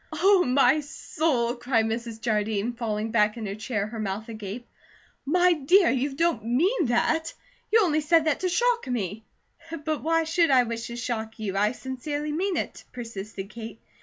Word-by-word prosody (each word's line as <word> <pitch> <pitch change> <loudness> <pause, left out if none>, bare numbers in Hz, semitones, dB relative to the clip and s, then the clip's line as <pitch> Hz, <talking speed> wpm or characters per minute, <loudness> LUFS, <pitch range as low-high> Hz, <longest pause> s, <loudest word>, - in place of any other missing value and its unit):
"Oh, 390 -1 +4
my 265 +2 +4
soul!" 285 -4 -1
cried 240 -2 +1
Mrs. 225 0 -4
Jardine, 215 0 -1
falling 220 -2 -3
back 215 -1 +2
in 225 - -5
her 195 - -3
chair, 215 0 -2
her 220 +1 -7
mouth 210 +2 -4
agape. 220 +2 -7 0.6
"My 360 +3 +4
dear, 340 +5 +4
you 270 +2 -1
don't 330 -6 +1
MEAN 320 - +1
that? 315 +7 +1 0.4
You 450 +1 +6
only 310 -4 +2
said 325 +1 +3
that 310 -3 +1
to 370 - 0
shock 475 - +1
me." 220 -3 -3 0.6
"But 310 -1 -1
why 330 +1 +2
should 330 +1 +2
I 260 -2 +5
wish 230 -1 -4
to 235 - -7
shock 225 -2 -4
you? 205 -3 -4
I 210 +3 +2
sincerely 290 +4 -4
mean 365 +4 -1
it," - - -4
persisted 210 -4 -7
Kate. 230 -1 -8
245 Hz, 175 wpm, -26 LUFS, 220-315 Hz, 0.6 s, You